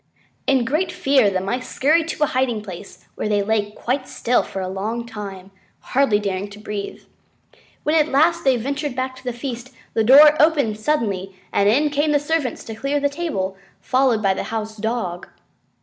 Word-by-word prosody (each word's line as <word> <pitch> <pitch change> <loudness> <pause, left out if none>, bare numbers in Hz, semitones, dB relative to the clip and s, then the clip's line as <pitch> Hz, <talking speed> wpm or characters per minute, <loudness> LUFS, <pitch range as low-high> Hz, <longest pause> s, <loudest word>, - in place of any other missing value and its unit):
In 265 -3 +3
great 310 +9 0
fear 280 - +3
the 190 -1 -1
Mice 240 +7 -3
scurried 315 +4 +2
to 315 - -1
a - - +6
hiding 255 -6 -1
place, 185 -5 -10
where 215 - -3
they 205 -1 +2
lay 210 0 0
quite 255 +5 -3
still 245 +1 +1
for 195 - -6
a 185 - -3
long 215 +5 -3
time, 200 -4 -8 0.3
hardly 265 -5 +2
daring 200 -1 -3
to 205 +1 -12
breathe. 210 -1 -6 0.8
When 300 - +1
at 310 -2 +4
last 330 +5 +3
they 265 -2 +4
ventured 280 +3 -3
back 260 0 -3
to - - -14
the 250 - -2
feast, 240 0 -6 0.2
the 225 - +2
door 295 +6 +8
opened 285 -9 +2
suddenly 200 -8 -1 0.2
and 200 0 +3
in 290 +7 +2
came 295 +1 +1
the 290 - +4
servants 295 -3 -2
to 225 - -7
clear 275 +5 -1
the 285 0 +1
table, 280 - -3 0.2
followed 255 -4 +1
by 195 -1 +3
the - - -4
House 220 -1 -4
Dog. 220 -5 -3
245 Hz, 190 wpm, -21 LUFS, 210-285 Hz, 0.8 s, door